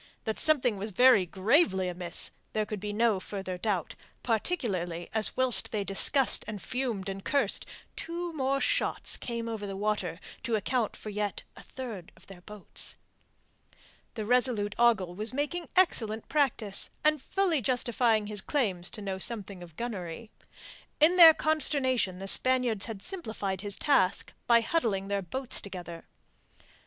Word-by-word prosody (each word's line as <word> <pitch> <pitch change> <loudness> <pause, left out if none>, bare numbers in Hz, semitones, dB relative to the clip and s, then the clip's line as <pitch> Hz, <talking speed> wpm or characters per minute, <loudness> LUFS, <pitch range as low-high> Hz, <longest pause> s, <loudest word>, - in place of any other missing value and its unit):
That 220 - -3
something 255 -8 +2
was 205 +3 -3
very 230 -3 +5
gravely 190 - +2
amiss 175 -1 -3 0.2
there 215 0 0
could 210 -1 -5
be 205 +1 -4
no 220 -1 +2
further 190 -1 -6
doubt, 190 -5 -2 0.3
particularly 200 - -2
as 220 -1 +3
whilst 255 -2 +4
they 210 -2 -1
discussed 245 +7 +3
and 215 -2 -5
fumed 240 -5 -3
and 195 0 -5
cursed 280 -1 0 0.3
two 340 +1 -5
more 275 -2 0
shots - - 0
came 235 -1 -5
over 220 -3 -5
the 195 -1 -6
water 195 -5 -2 0.2
to 230 - -1
account 225 +2 -1
for 215 - -8
yet 205 -1 -3
a - - -12
third 230 -9 -8
of - - -19
their 190 -2 -13
boats. 210 +1 -8 1.2
The 215 -3 -4
resolute 235 -4 +1
Ogle 220 -7 +3
was 215 +6 +1
making 315 +4 -3
excellent 225 - +1
practice, 255 -9 +1
and 305 -2 +2
fully 355 -3 0
justifying 240 -2 +1
his 205 -1 0
claims 195 -12 -1
to 210 - -9
know 190 -1 -4
something 200 -3 -2
of 170 -3 -12
gunnery. 215 -3 -6 0.7
In 315 +4 +5
their 330 -3 +9
consternation 260 - 0
the 195 +1 -7
Spaniards 250 -2 +4
had 210 -4 -7
simplified 220 - -4
his 200 -1 -1
task 200 -10 +1
by 235 0 +5
huddling 220 -8 -1
their 200 0 -1
boats 250 +8 -4
together. 175 -4 -8
220 Hz, 150 wpm, -29 LUFS, 195-260 Hz, 1.2 s, their